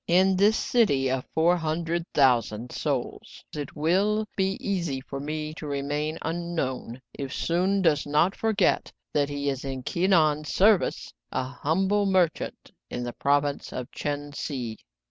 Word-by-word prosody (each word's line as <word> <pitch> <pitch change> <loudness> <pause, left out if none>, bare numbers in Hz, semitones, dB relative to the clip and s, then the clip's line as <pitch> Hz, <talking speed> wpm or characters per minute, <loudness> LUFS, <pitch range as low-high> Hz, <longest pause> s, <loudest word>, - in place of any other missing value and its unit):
In 190 +2 +4
this 205 +4 +4
city 140 - +2
of 130 -1 -2
four 170 +2 +4
hundred 165 +1 -1
thousand 120 -4 +2
souls 135 -5 -3
it 145 -2 -5
will 195 +8 +2
be 195 0 0
easy 170 -9 -2
for 135 +1 -7
me 155 +1 -4
to 155 - -6
remain 145 +2 -2
unknown, 160 -8 -3
if 135 -1 -5
Soun 185 +6 +1
does 150 -4 +2
not 150 +6 +2
forget 220 -3 +1 0.2
that 145 -1 +2
he 145 0 -3
is 135 -2 -1
in 135 -2 -4
Ki 180 +7 0
Nan*s 155 -5 +3
service, 200 - +3 0.2
a 130 - -1
hum 155 +8 -1
ble 205 0 +2
merchant 185 -4 0 0.2
in 125 - -4
the 120 0 -4
province 145 0 0
of 125 - -6
Chen 145 0 -4
Si." 125 -7 -4
155 Hz, 155 wpm, -26 LUFS, 140-180 Hz, 0.2 s, In